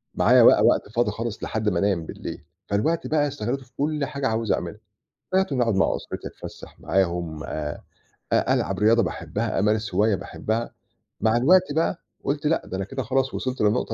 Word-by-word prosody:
معايا - - +5
بقى - - +7
وقت - - +3
فاضي 115 0 +1
خالص 115 +1 -5
لحد 110 -1 -1
ما 90 -4 0
أنام 95 -4 +1
بليل، - - -7 0.2
فالوقت 130 +12 0
بقى 150 -1 +2
استغلِّيته 135 -1 -3
في 125 - -25
كل 150 0 0
حاجة 140 -1 -2
عاوز 110 -1 0
أعملها. - - -2 0.5
بقيت 190 -4 +2
إن 130 - +1
أقعُد 115 -4 +2
مع 95 - +2
أسرتي - - -6
أتفسَّح - - -11
معاهم، 85 -4 -1
آآ 75 -1 -4 0.5
أ - - +3
ألعب - - -1
رياضة 115 +2 +4
باحبّها، 110 0 -2
أمارس 105 0 0
هواية 105 +1 +3
باحبّها. 110 +4 -3 0.5
مع 110 +2 +3
الوقت 175 +5 +4
بقى، 165 +2 0 0.2
قُلت 145 +2 -2
لأ، 165 - +2
ده 95 - -5
أنا 95 - -2
كده 130 +5 -4
خلاص 130 +3 0
وصِلت 130 0 -3
للنُقطة 110 +2 +1
115 Hz, 185 wpm, -24 LUFS, 105-135 Hz, 0.5 s, بقى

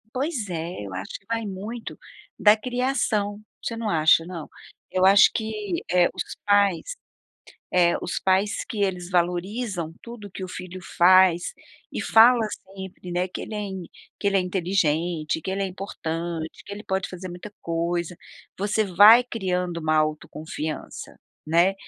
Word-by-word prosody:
Pois 260 - -2
é, 170 -4 -4
eu 95 - -8
acho 95 +1 -6
que 195 - -33
vai 230 -1 -2
muito 210 +4 -6 0.4
da 210 0 +6
criação. 245 -4 -1 0.2
Você 230 - -3
não 225 -2 -2
acha, 160 -1 +4
não? 170 -3 -7 0.4
Eu 185 0 +2
acho 195 +1 +8
que, 215 -5 -3
eh, 175 0 +4
os - - -5
pais, 205 -3 +3 0.9
eh, 175 -1 +4
os 175 - -3
pais 190 +3 +1
que 220 - -5
eles 180 -2 -2
valorizam 180 +1 -1
tudo 235 -3 -9
o - - -22
que 190 - -8
o 185 - -4
filho 185 0 -8 0.2
faz 180 -1 +5 0.4
e - - -3
fala 235 +2 +6 0.4
sempre, 190 -1 -8
né, 180 +1 0
que - - -6
ele - - -7
é - - -2
in 190 -2 -5 0.4
que - - -3
ele 200 -1 +3
é - - +3
inteligente, 170 -3 0
que - - -4
ele 195 +1 -1
é - - 0
importante, 170 -3 -5
que - - -9
ele 205 +1 -7
pode 190 -1 -1
fazer 185 0 -7
muita 180 +4 -9
coisa; 170 +1 -2 0.4
você 210 +2 +1
vai 205 +5 +8
criando 180 -7 -2
uma 155 0 +1
autoconfiança, 155 0 -3 0.3
né. 170 +5 +3
185 Hz, 160 wpm, -24 LUFS, 170-205 Hz, 0.9 s, acho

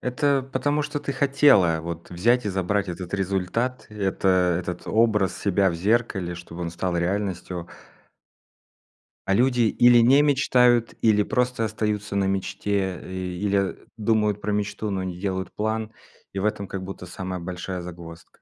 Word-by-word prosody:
это 135 +2 +1
потому 145 +1 0
что 145 - -4
ты 140 -1 -3
хотела 135 - +4
вот 85 +1 -7
взять 115 +6 +2
и - - +1
забрать 95 +1 -1
этот 90 +1 -6
результат, 100 +6 -1
это 100 -2 -1 0.3
этот 90 0 -5
образ 105 -5 +2
себя 100 -1 +2
в - - -4
зеркале, 95 -2 0
чтобы 85 0 -10
он 85 - -3
стал 85 +1 -2
реальностью. 90 -1 -2 1.6
А 95 - +1
люди 125 +2 +3
или 120 +2 +5
не 135 +5 +6
мечтают, 125 -4 +3
или 105 -2 +4
просто 125 0 0
остаются 105 -2 -2
на 100 - +2
мечте, 95 -1 -1
э, - - -11 0.4
или, 100 0 +1
а, 100 -1 0 0.2
думают 105 -1 +1
про 105 - -2
мечту, 105 +1 -2
но 95 -1 -2
не 90 -1 -5
делают 95 -1 -3
план, 110 +1 -2 0.4
и 95 - -3
в 100 - -1
этом 100 -2 -1
как 95 -1 -5
будто 95 -1 -7
самая 90 0 -5
большая 90 +1 -5
загвоздка. 85 -1 -11
100 Hz, 160 wpm, -24 LUFS, 90-115 Hz, 1.6 s, не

